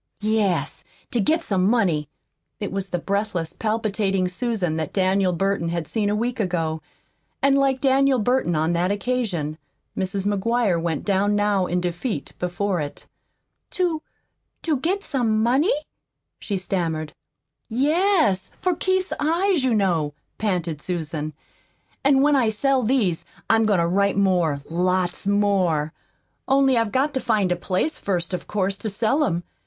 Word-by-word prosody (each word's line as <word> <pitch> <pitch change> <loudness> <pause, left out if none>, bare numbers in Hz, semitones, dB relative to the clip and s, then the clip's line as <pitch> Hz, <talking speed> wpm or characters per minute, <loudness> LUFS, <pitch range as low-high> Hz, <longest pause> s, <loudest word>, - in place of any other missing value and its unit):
"Yes, 215 -4 0 0.3
to 240 - 0
get 320 - +2
some 190 - 0
money." 185 - +2 0.5
It 205 - -4
was 195 0 -3
the 175 - -1
breathless, 200 -3 -2
palpitating 210 -4 0
Susan 185 -4 -1
that 155 -2 -3
Daniel 190 -1 +2
Burton 195 -1 0
had 170 -2 -3
seen 210 -3 0
a 205 - +1
week 240 +3 -2
ago, 165 -5 -1 0.6
and 275 0 +3
like 270 -1 +2
Daniel 270 0 +3
Burton 245 -6 +1
on 160 +2 +1
that 175 +2 +1
occasion, 200 -8 -2 0.4
Mrs. 190 +1 -2
McGuire 205 -2 +1
went 165 -3 -2
down 205 +1 +2
now 205 -3 +2
in 180 +1 0
defeat 180 +6 -3
before 180 0 -1
it. 145 -1 -7 0.6
"To 345 -4 -1 0.6
to 315 -4 +1
get 370 +9 -1
some 225 -6 0
money?" 265 - +3 0.7
she 200 - -3
stammered. 165 -5 -2 0.6
"Yes 295 - +2
for 365 -2 +1
Keith's 375 +1 0
eyes, 335 +1 +2
you 255 -3 +2
know," 165 -8 +1 0.2
panted 175 -7 -1
Susan. 155 -3 -3 0.7
"An' 275 0 +4
when 295 0 +4
I 245 -5 +3
sell 265 +5 +1
these, 220 -8 +1 0.3
I'm 225 -1 +4
goin' 205 -3 +3
to 170 - +2
write 200 +3 +1
more 175 -7 +2
lots 180 +2 0
more. 190 -7 +2 0.5
Only 270 -1 +4
I've 230 -2 +1
got 270 +5 +1
to 265 - 0
find 215 -7 +1
a - - +3
place, 185 - -1
first, 180 -2 -2
of 180 - -4
course, 195 -1 -1
to 220 - -3
sell 225 +9 +1
'em. 175 -6 -1
200 Hz, 150 wpm, -23 LUFS, 180-250 Hz, 0.7 s, An